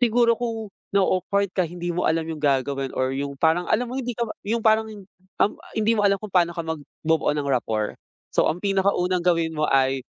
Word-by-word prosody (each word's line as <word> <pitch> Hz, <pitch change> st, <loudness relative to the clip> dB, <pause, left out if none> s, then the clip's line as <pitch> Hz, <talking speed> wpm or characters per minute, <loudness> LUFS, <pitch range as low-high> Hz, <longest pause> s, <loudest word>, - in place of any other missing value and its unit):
siguro 235 Hz, 0 st, +4 dB
kung 225 Hz, -4 st, -4 dB, 0.2 s
na-o-awkward 195 Hz, 0 st, +1 dB
ka 185 Hz, -, +2 dB
hindi 175 Hz, +1 st, -4 dB
mo 175 Hz, -, -1 dB
alam 160 Hz, 0 st, +1 dB
yung 160 Hz, -2 st, -6 dB
gagawin 135 Hz, -1 st, +1 dB
or 130 Hz, 0 st, 0 dB
yung 140 Hz, 0 st, -4 dB
parang 165 Hz, +3 st, +2 dB
alam 245 Hz, +3 st, +2 dB
mo 245 Hz, -, -6 dB
hindi 255 Hz, -2 st, -2 dB
ka 235 Hz, -, -1 dB, 0.2 s
yung 220 Hz, +3 st, 0 dB
parang 220 Hz, 0 st, +4 dB, 0.5 s
um, -, -, +3 dB, 0.2 s
hindi 220 Hz, +1 st, +1 dB
mo 210 Hz, -, +1 dB
alam 200 Hz, -1 st, +3 dB
kung 215 Hz, -3 st, -9 dB
pa'no 175 Hz, -1 st, +4 dB
ka 165 Hz, -1 st, -4 dB
magbubuo 160 Hz, 0 st, -1 dB
ng 145 Hz, -1 st, -2 dB
rapport. 110 Hz, -5 st, 0 dB, 0.4 s
So -, -, +3 dB
ang 165 Hz, -, -3 dB
pinakaunang 190 Hz, -2 st, +1 dB
gawin 165 Hz, -2 st, +1 dB
mo 150 Hz, 0 st, 0 dB
ay, 135 Hz, -1 st, +2 dB
175 Hz, 200 wpm, -24 LUFS, 150-210 Hz, 0.5 s, siguro